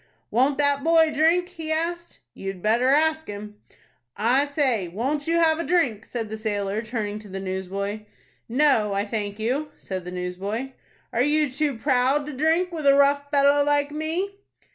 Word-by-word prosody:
"Won't 265 +4 +2
that 285 -1 +2
boy 325 -1 +4
drink?" 335 +4 +2
he 325 -3 -6
asked. 340 +2 -3
"You 195 - -9
had 195 -2 -5
better 230 +4 +2
ask 315 +3 +3
him." 210 0 -8 0.6
"I 245 +7 +3
say, 265 - 0
won't 265 - -2
you 330 - +2
have 325 -1 +3
a - - -1
drink?" 260 - 0
said 225 -3 -5
the 220 - -5
sailor, 205 -1 -2
turning 215 -2 -4
to 210 -1 -13
the 195 +1 -5
newsboy. 195 +2 -4 0.4
"No, 240 -5 +3
I 200 +1 0
thank 205 -2 -4
you," 260 +8 -1
said 185 -2 -6
the 180 - -7
newsboy. 190 +8 -4 0.4
"Are 235 - +1
you 295 +1 +2
too 280 -1 -1
proud 265 +3 +2
to 300 - -6
drink 325 +6 +1
with 315 -4 -2
a 275 - +7
rough 285 0 +3
fellow 285 0 +4
like 290 0 +1
me?" 335 +7 -3
270 Hz, 180 wpm, -24 LUFS, 210-305 Hz, 0.6 s, a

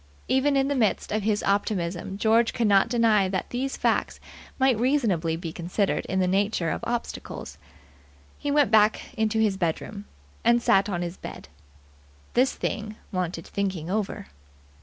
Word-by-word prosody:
Even 275 +2 +2
in 270 0 +2
the 285 - 0
midst 230 -6 0
of 215 +1 0
his 210 0 0
optimism 195 -2 -1
George 225 +2 +3
could 235 - +1
not 200 +1 +4
deny 225 -5 +3
that 185 -1 -3
these 265 +2 -2
facts - - 0 0.4
might 260 -4 +3
reasonably 220 - +1
be 165 -1 -6
considered 180 +4 -1
in 190 - 0
the 185 - +2
nature 195 -3 +1
of - - -4
obstacles. 240 0 -5 0.8
He 290 - -3
went 290 -2 +3
back 215 +2 +3
into 220 -3 0
his 210 -3 +2
bedroom, 195 +4 -3 0.4
and 235 +1 +4
sat 200 -3 +3
on 175 -3 -2
the 175 -1 -2
bed. - - -9 0.8
This 255 +2 +3
thing 215 0 -3 0.2
wanted 180 -3 -3
thinking 185 -4 -3
over. 210 -1 -2
210 Hz, 160 wpm, -26 LUFS, 185-235 Hz, 0.8 s, not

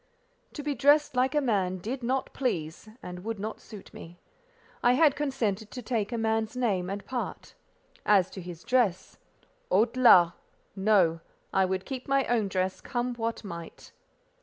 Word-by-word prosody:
To 295 - -6
be 295 0 -1
dressed 285 +2 +3
like 255 +3 +2
a - - +5
man 195 -8 0
did 235 +9 -5
not 260 +3 -1
please, 170 - -3
and 180 0 -7
would 225 +1 -3
not 215 +2 -5
suit 210 -3 -12
me. 175 +1 -11 0.6
I 245 - +4
had 290 +1 +4
consented 225 -8 -2
to 250 +1 -8
take 220 -2 -1
a 235 - -2
man's 220 +1 -1
name 195 -7 0
and 200 +1 -5
part; 255 -2 -5 0.5
as 190 -3 +3
to 190 - -7
his 175 -1 -9
dress—halte 250 - -1
là! 175 -8 +7 0.4
No. 190 -5 +3 0.3
I 190 0 +4
would 185 0 -2
keep 260 -2 -6
my 275 -1 +2
own 230 -4 +1
dress, 185 0 -2
come 245 0 -2
what 230 -1 -3
might. 170 -4 -9
220 Hz, 160 wpm, -28 LUFS, 190-255 Hz, 0.6 s, là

